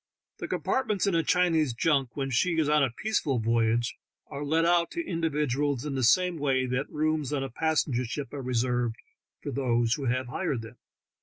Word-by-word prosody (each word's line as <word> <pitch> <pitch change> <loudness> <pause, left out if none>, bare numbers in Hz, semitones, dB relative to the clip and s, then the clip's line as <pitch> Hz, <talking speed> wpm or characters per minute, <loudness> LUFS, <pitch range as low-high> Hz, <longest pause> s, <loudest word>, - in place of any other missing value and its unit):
The - - -4
compartments 220 -7 0
in 200 - +1
a 165 - +3
Chinese 160 -7 +2
junk 135 -3 +1
when 135 -1 -2
she 165 +7 +1
is 155 -2 +2
on 150 -1 +4
a 135 - +2
peaceful 145 - -1
voyage 115 +1 +1 0.3
are 140 - -5
let 160 +3 +2
out 170 0 +3
to 335 - -1
individuals 145 -5 -1
in 145 - -3
the 135 - -1
same 180 +8 +3
way 135 -2 +1
that 125 +2 -2
the - - -21
rooms 155 -2 0
on 140 -2 -1
a 135 - -5
passenger 145 -3 0
ship 140 +5 -5
are 140 - -4
reserved 125 -2 0 0.5
for - - -4
those 120 -3 +1
who 140 0 -3
have 130 +1 0
hired 135 -5 -2
them. 115 +2 -11
140 Hz, 200 wpm, -28 LUFS, 125-160 Hz, 0.5 s, on